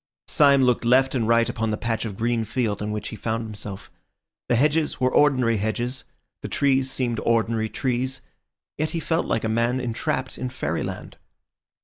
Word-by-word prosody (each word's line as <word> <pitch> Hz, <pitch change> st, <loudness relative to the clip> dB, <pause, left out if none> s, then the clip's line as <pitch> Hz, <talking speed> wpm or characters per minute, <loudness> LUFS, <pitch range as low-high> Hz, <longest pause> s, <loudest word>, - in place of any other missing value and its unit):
Syme 140 Hz, -2 st, +5 dB
looked 125 Hz, -1 st, +2 dB
left 130 Hz, +3 st, +4 dB
and 120 Hz, -5 st, 0 dB
right 115 Hz, 0 st, +4 dB
upon 110 Hz, 0 st, -2 dB
the 105 Hz, -, -1 dB
patch 115 Hz, 0 st, -2 dB
of 100 Hz, -4 st, -5 dB
green 115 Hz, 0 st, 0 dB
field 110 Hz, -3 st, -2 dB
in 105 Hz, -, -2 dB
which 105 Hz, 0 st, -4 dB
he -, -, -7 dB
found 115 Hz, +2 st, -2 dB
himself. 105 Hz, -3 st, -8 dB, 0.6 s
The 120 Hz, -, +4 dB
hedges 150 Hz, +5 st, +1 dB
were 130 Hz, 0 st, +1 dB
ordinary 130 Hz, -6 st, +4 dB
hedges, 120 Hz, +5 st, -2 dB, 0.4 s
the -, -, -5 dB
trees 135 Hz, -2 st, +2 dB
seemed 120 Hz, -4 st, -1 dB
ordinary 115 Hz, -1 st, +1 dB
trees; 130 Hz, +2 st, -2 dB, 0.6 s
yet 155 Hz, +1 st, 0 dB
he -, -, 0 dB
felt 165 Hz, +1 st, -1 dB
like 115 Hz, -, 0 dB
a -, -, 0 dB
man 115 Hz, +3 st, +1 dB
entrapped 125 Hz, +1 st, -2 dB
in 130 Hz, -, -2 dB
fairyland. 130 Hz, -, -4 dB
120 Hz, 175 wpm, -24 LUFS, 110-130 Hz, 0.6 s, Syme